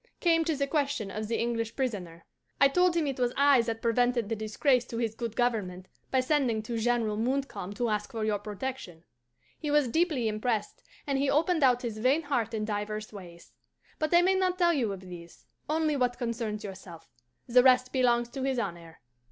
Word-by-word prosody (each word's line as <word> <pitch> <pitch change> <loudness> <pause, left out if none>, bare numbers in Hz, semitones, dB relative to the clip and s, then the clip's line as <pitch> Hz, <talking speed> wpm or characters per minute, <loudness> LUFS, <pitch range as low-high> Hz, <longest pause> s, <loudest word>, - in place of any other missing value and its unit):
came 330 -2 +3
to 320 -1 0
the 280 0 0
question 280 -8 -1
of 215 +1 -4
the 230 - -1
English 230 -1 -2
prisoner. 185 -11 -4 0.3
I 275 - +6
told 360 +3 +3
him 330 -2 +1
it 270 -2 -3
was 245 -1 +1
I 280 -2 +5
that 230 -1 -4
prevented 240 -1 +1
the 225 - -1
disgrace 235 +4 +1
to 235 - -6
his 230 -2 -1
good 230 -1 -5
government 195 -7 -1 0.2
by 260 - +2
sending 255 -6 +1
to 230 +1 -3
General 225 -2 0
Montcalm 255 -4 -2
to 245 +1 -1
ask 210 -1 -1
for 225 -2 -3
your 210 -1 0
protection. 210 -4 -6 0.6
"He 300 - -4
was 295 -2 +3
deeply 310 -5 +1
impressed, 215 0 -2 0.2
and 275 -2 0
he 275 0 +1
opened 320 +3 +2
out 250 -2 +4
his 225 -3 -4
vain 265 +8 +2
heart 235 -6 -1
in 215 -1 -2
divers 215 0 -4
ways. 175 -4 -12 0.5
But 310 -1 -1
I 345 0 +6
may 375 +1 +4
not 370 -1 +1
tell 345 -2 +3
you 240 -9 0
of 195 -1 -6
these 175 -2 -12 0.2
only 310 -1 +1
what 250 -2 0
concerns 230 -3 -3
yourself; 185 -4 -10 0.4
the 250 +1 +5
rest 255 0 +4
belongs 240 -2 +2
to 265 +2 -6
his 265 -1 0
honour. 170 -7 -5
240 Hz, 200 wpm, -29 LUFS, 215-275 Hz, 0.6 s, I